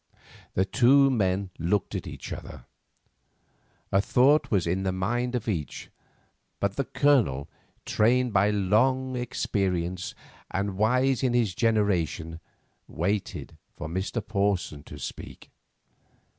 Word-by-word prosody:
The 95 - +3
two 135 +6 +5
men 95 -4 0
looked 90 +4 0
at - - -4
each - - -7
other. 65 - -9 1.3
A 95 - +4
thought 135 +8 +3
was 95 -6 +1
in 90 +3 0
the 95 -1 0
mind 120 +7 -1
of 120 -2 -3
each; 85 -9 -4 0.7
but 100 0 -1
the 140 - -1
Colonel, 130 - +2 0.4
trained 120 +2 +2
by 100 +1 +4
long 125 +6 +2
experience, 95 -7 -2 0.3
and 95 +1 -2
wise 125 +5 +2
in 125 -2 +1
his 115 -6 +2
generation, 90 -7 0 0.5
waited 95 +6 -3 0.2
for - - -5
Mr. 95 +7 -3
Porson 100 -7 0
to 75 - -10
speak. 65 - -8
100 Hz, 120 wpm, -27 LUFS, 95-125 Hz, 1.3 s, two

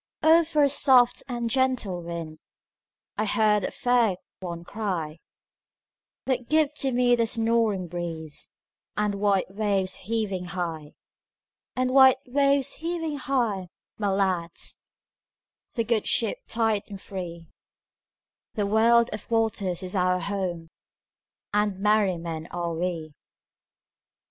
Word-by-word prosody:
"O 325 +2 +6
for 305 -2 +1
a - - +5
soft 255 -3 +5
and 240 -2 -3
gentle 250 -8 0
wind!"I 170 +5 -9
heard 210 -1 +2
a - - -1
fair 240 -5 +2 0.2
one 170 -2 -6
cry:But 200 - -7
give 305 -1 +3
to 270 - +1
me 245 0 +3
the 230 -1 +1
snoring 225 -5 +1
breezeAnd 170 +4 -5
white 195 -2 0
waves 195 -3 +1
heaving 210 -5 -2
high; 170 -4 -5 0.8
And 255 0 0
white 265 -1 +7
waves 275 +1 +2
heaving 325 -2 -3
high, 235 -9 -1 0.3
my 205 - 0
lads, 190 -4 0 0.9
The 230 - +1
good 225 -1 0
ship 225 -3 +1
tight 225 -2 +1
and 200 -2 -9
free—The 180 +3 -9
world 230 +3 +4
of 215 - -8
waters 205 -5 0
is 185 +2 -3
our 180 -1 +2
home, 175 -3 -4 0.8
And 210 -2 0
merry 210 -3 +2
men 165 -1 -6
are 170 -1 -3
we. 165 -2 -3
210 Hz, 115 wpm, -26 LUFS, 180-240 Hz, 0.9 s, white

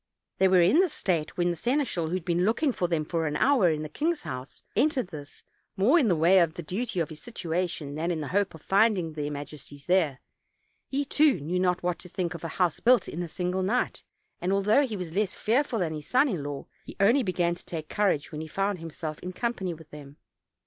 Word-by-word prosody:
They 190 - +6
were 185 -1 +5
in 195 - +5
this 365 -5 +2
state 165 -5 -1
when 175 0 +2
the - - -3
seneschal, 240 - 0
who 170 - -2
had 180 -3 -4
been 175 0 +1
looking 230 +8 +2
for 180 -7 -1
them 165 -3 0
for 165 0 -1
an 150 - -2
hour 255 - +4
in 155 -1 -1
the - - -4
king's 310 - -1
house, 130 +1 -7
entered 270 - +2
this, 145 -4 -10 0.3
more 245 - +5
in 265 - +3
the 180 - +3
way 170 +4 +5
of 165 -2 +2
the 175 - -6
duty 195 +5 -3
of 165 - 0
his 155 -1 -9
situation 175 - -3
than 160 +3 -2
in 170 -2 -1
the 150 - -4
hope 195 -2 0
of 160 - -14
finding 195 -5 +2
their 150 -1 -3
majesties 145 -1 -8
there; 165 -8 +2 0.7
he 280 +1 -1
too 295 0 +3
knew 170 +6 -2
not 180 -1 +1
what 180 -1 -1
to 180 - -12
think 175 -1 -2
of 170 - -8
a - - -2
house 180 -4 +1
built 245 0 +4
in 170 - -4
a 175 - -3
single 180 +2 -2
night; 225 +7 0 0.4
and 180 - 0
although 210 +8 +3
he 215 -4 -4
was 175 -3 -6
less 200 0 0
fearful 245 +2 +1
than 170 -6 -1
his 150 -1 -7
son 260 +4 +4
in 185 - -2
law, 145 -1 -5 0.2
he - - -10
only 230 +8 +5
began 180 -5 0
to 175 - -9
take 160 -3 -6
cour 205 +3 +2
age 150 -2 -2
when 155 -1 -5
he 160 - -6
found 195 +3 -1
himself 160 -1 -6
in 180 - -6
company 195 -3 -2
with 160 -1 -16
them. 145 -1 -11
180 Hz, 240 wpm, -27 LUFS, 160-210 Hz, 0.7 s, They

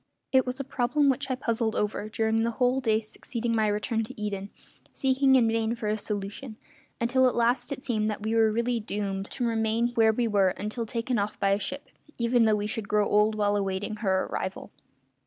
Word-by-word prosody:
It 260 -1 +4
was 250 +2 -3
a - - -2
problem 275 +2 +1
which 265 - -3
I 260 - +1
puzzled 230 -3 -1
over 210 0 -2
during 220 0 +1
the 230 - +1
whole 255 +1 +2
day 220 -3 +2
succeeding 230 +2 -4
my 220 -1 +2
return 215 +2 0
to 215 - -11
Eden, 200 -1 -3 0.4
seeking 265 0 +3
in 240 -3 +5
vain 225 0 0
for 235 -2 -6
a 210 - +1
solution, 210 +3 -5 0.4
until 255 +2 +3
at - - -5
last 245 +2 +1
it 275 -1 -5
seemed 220 -5 0
that 210 -1 -4
we 220 +1 -1
were 225 -1 +4
really 235 +2 0
doomed 200 -2 -3
to 245 - -3
remain 225 +1 +1
where 225 -2 +4
we 235 +2 0
were 195 -4 +2
until 220 +2 -4
taken 235 +1 -1
off 205 +1 -3
by 195 - +2
a 200 - +2
ship, 280 +7 -5 0.3
even 235 0 +3
though 215 -1 +4
we 205 0 -2
should 210 -1 -4
grow 210 -1 +2
old 210 +1 +3
while 205 -1 +1
awaiting 200 +2 -2
her 190 -4 +1
arrival. 190 0 -5
225 Hz, 210 wpm, -27 LUFS, 210-245 Hz, 0.4 s, in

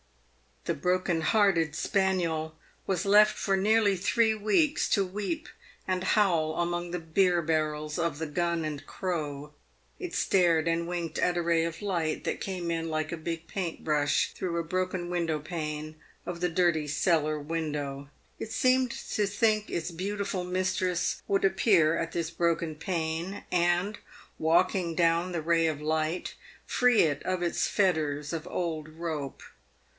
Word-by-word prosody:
The - - 0
broken 180 +1 0
hearted 170 -5 +3
spaniel 170 -6 0 0.3
was 190 -2 0
left 210 +1 +6
for 195 -1 +1
nearly 210 0 +3
three 220 +5 +2
weeks 215 +9 +2
to 200 -2 +3
weep 210 - -4 0.4
and 185 -1 0
howl 170 -6 +2
among 175 0 -1
the 175 +1 -3
beer 175 +2 +2
barrels 155 -1 -1
of 165 -3 0
the 160 - -2
" - - -6
Gun 170 +1 -1
and 150 -2 -4
Crow." 150 -5 -4 0.5
It 365 -2 -5
stared 170 -4 +3
and 165 0 0
winked 170 -2 -3
at 175 0 +1
a - - +2
ray 165 -1 +2
of 165 +3 -5
light 170 -6 -1
that - - -3
came 180 -3 -3
in 165 -1 -2
like 155 0 -2
a 170 - -3
big 165 +1 -5
paint 180 -3 -4
brush 145 -2 +1
through 175 -2 -3
a 170 - 0
broken 185 +1 -2 0.3
pane 155 -1 -5 0.3
of 175 -1 -5
the 180 - +2
dirty 165 -3 +2
cellar 155 0 +1
window. 145 -3 -4 0.3
It 220 - -5
seemed 255 0 +3
to 210 - -2
think 215 +1 +1
its 170 0 -2
beautiful 195 +1 -3
mistress 185 -1 -1
would 195 0 +2
appear 190 -4 +4
at 165 0 -2
this 170 -1 -2
broken 170 -1 0
pane, 165 +3 -3
and, 175 +4 +1 0.4
walking 170 +1 +2
down 170 +1 +2
the 170 -2 -2
ray 165 0 +3
of 155 -2 -2
light, 155 +3 -1 0.3
free 250 -2 +4
it 145 -3 +1
of 185 -1 -1
its 170 - 0
fetters 155 -6 0
of 165 -1 -4
old 160 -3 -3
rope. 155 -4 -5
170 Hz, 155 wpm, -28 LUFS, 160-190 Hz, 0.5 s, left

